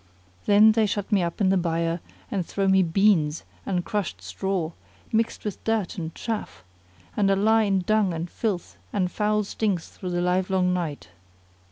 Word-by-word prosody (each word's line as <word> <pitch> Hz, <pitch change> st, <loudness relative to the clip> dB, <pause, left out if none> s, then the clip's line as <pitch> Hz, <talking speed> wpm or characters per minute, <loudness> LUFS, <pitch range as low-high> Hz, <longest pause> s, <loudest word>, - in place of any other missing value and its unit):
Then 210 Hz, +2 st, +7 dB
they 220 Hz, -1 st, +2 dB
shut 205 Hz, +2 st, -3 dB
me 200 Hz, -3 st, +4 dB
up 170 Hz, -1 st, -3 dB
in 190 Hz, -, +4 dB
the 190 Hz, -, +3 dB
byre 170 Hz, -1 st, 0 dB, 0.3 s
and 195 Hz, -3 st, 0 dB
throw 195 Hz, +3 st, -1 dB
me 190 Hz, 0 st, +5 dB
beans 170 Hz, -3 st, +2 dB, 0.2 s
and 180 Hz, -3 st, -1 dB
crushed 190 Hz, -, -2 dB
straw,[FN#25] 165 Hz, -, -5 dB
mixed 225 Hz, 0 st, 0 dB
with 210 Hz, -, -4 dB
dirt 220 Hz, -4 st, -1 dB
and 165 Hz, -1 st, -5 dB
chaff; 225 Hz, -, -4 dB, 0.5 s
and 200 Hz, -2 st, +2 dB
I 195 Hz, -, +4 dB
lie 220 Hz, +3 st, +4 dB
in 195 Hz, -2 st, +2 dB
dung 210 Hz, 0 st, +2 dB
and 165 Hz, +1 st, -3 dB
filth 190 Hz, -1 st, -3 dB
and 185 Hz, -3 st, 0 dB
foul 210 Hz, 0 st, +1 dB
stinks 200 Hz, -4 st, -2 dB
through 185 Hz, -, -7 dB
the 175 Hz, 0 st, -1 dB
livelong 180 Hz, 0 st, +1 dB
night. 165 Hz, -5 st, -3 dB
190 Hz, 175 wpm, -25 LUFS, 175-210 Hz, 0.5 s, Then